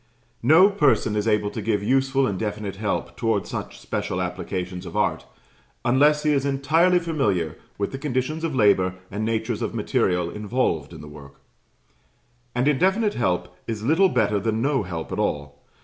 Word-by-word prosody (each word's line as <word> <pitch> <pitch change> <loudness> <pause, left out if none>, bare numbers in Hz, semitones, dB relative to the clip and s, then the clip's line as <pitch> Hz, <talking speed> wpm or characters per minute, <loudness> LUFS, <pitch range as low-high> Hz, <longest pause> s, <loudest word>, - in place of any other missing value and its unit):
No 165 - +6
person 145 - +2
is 105 +1 -1
able 105 -1 +1
to 110 - -5
give 105 -1 0
useful 135 +3 +2
and 100 -7 -2
definite 105 -2 -4
help 105 0 -2
towards 110 -4 -1
such - - -6
special - - -3
applications 90 0 -4
of - - -6
art, - - 0 0.6
unless 145 +5 +4
he 155 - +2
is 140 -2 +1
entirely 155 +6 +3
familiar 120 - 0 0.2
with 100 - -2
the 135 - -6
conditions 145 +3 -2
of 160 -4 -2
labour 95 -5 +3 0.2
and 105 +3 -3
natures 110 0 -1
of - - -3
material 90 -2 0
involved 105 - -1
in - - -10
the 75 - -10
work; 70 -2 -13 1.2
and 125 +3 +1
indefinite 190 +9 +2
help 90 -5 -1
is 110 -2 -4
little 165 +9 +4
better 105 - +1
than 110 +2 -1
no 135 +2 +1
help 85 -5 -6
at - - -3
all. 70 0 -2
115 Hz, 170 wpm, -24 LUFS, 100-140 Hz, 1.2 s, No